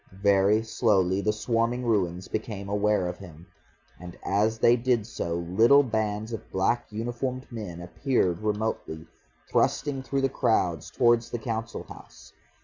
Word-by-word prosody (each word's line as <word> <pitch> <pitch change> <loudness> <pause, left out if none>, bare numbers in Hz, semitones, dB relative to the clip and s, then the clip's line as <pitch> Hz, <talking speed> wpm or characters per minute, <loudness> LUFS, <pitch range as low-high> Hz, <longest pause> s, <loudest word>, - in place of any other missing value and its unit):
Very 100 +2 +4
slowly 100 -4 +1
the 105 - +1
swarming 115 +3 -1
ruins 95 -5 0
became 105 -2 -5
aware 105 -2 +1
of 90 - -6
him. 85 -4 -12 0.5
And 90 0 -10
as 105 +3 +1
they 115 +2 +5
did 120 -3 +1
so 95 -6 -4
little 110 +12 +4
bands 110 -2 -2
of 110 - -7
black 95 +6 0
uniformed 120 +4 -3
men 105 -7 -6
appeared 90 -1 0
remotely, 105 -7 -3 0.4
thrusting 135 -2 0
through 135 +1 -2
the 135 - +3
crowds 90 - 0
towards 120 -1 +2
the - - -3
Council 115 0 -4
House. - - -14
110 Hz, 140 wpm, -27 LUFS, 95-120 Hz, 0.5 s, they